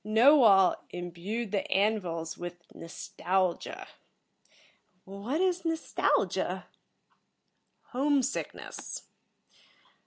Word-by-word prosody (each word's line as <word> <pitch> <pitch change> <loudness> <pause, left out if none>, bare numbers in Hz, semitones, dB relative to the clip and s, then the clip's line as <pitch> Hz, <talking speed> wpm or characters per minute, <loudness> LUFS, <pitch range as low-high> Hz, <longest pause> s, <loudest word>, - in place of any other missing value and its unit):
"Knowall 220 -3 +6
imbued 180 +6 -5
the 200 - -2
An 210 +3 +3
vils 165 -3 -5
with 175 0 -6 0.2
nostalgia." 180 +2 -2 1.2
"What 200 - -3
is 360 -2 +1
nostalgia?" 325 -1 0 1.3
"Home 275 +1 +2
sickness." 270 - -5
205 Hz, 70 wpm, -29 LUFS, 180-270 Hz, 1.3 s, Knowall